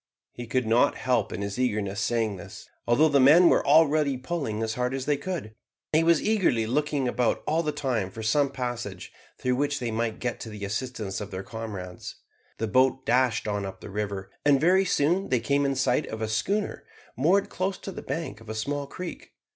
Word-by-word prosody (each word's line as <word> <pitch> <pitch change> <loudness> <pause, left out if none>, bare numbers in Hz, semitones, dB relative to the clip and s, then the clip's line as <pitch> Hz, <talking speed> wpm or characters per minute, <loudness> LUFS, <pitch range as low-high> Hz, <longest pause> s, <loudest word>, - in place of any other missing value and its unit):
He 120 -1 -8
could 125 +1 0
not 115 +5 +3
help 125 -5 0
in 100 - -4
his 100 +3 -4
eagerness 105 -5 -1
saying 110 -3 0
this, 90 - -11 0.2
although 125 +7 +5
the 140 -2 +3
men 160 +7 +7
were - - +3
already 150 -2 +4
pulling 130 -6 -3
as 110 0 -1
hard 125 +2 -1
as 135 -1 -4
they 145 - +2
could. 155 -8 -5 0.4
He 155 - +5
was 165 -1 +4
eagerly 185 - +2
looking 140 +2 0
about 120 -1 0
all 160 +2 +1
the 155 -2 -1
time 130 -10 -1
for 110 +3 -8
some 140 +6 +2
passage 120 -8 -5 0.2
through 125 0 0
which 145 +1 0
they 120 -2 -2
might 110 0 -1
get 120 -1 -3
to 115 - -7
the 105 -2 -6
assistance 105 -1 -4
of 105 - -6
their 95 -1 -5
comrades. 100 -5 -7 0.4
The 115 - -1
boat 130 +3 +2
dashed 125 -3 +2
on 100 -1 -1
up 95 -1 -6
the - - -10
river, 100 -2 -4
and 145 -2 +4
very 185 +5 +4
soon 180 +2 +1
they 125 -2 +2
came 140 +3 +1
in 135 - 0
sight 135 +3 +1
of 110 - -6
a 110 - -2
schooner 200 - -1 0.3
moored 175 - +2
close 190 +1 -2
to 195 - -7
the - - -7
bank 140 -6 -5
of 110 - -13
a 110 - -4
small 140 +5 -2
creek. 180 +4 -8
125 Hz, 210 wpm, -26 LUFS, 110-145 Hz, 0.4 s, men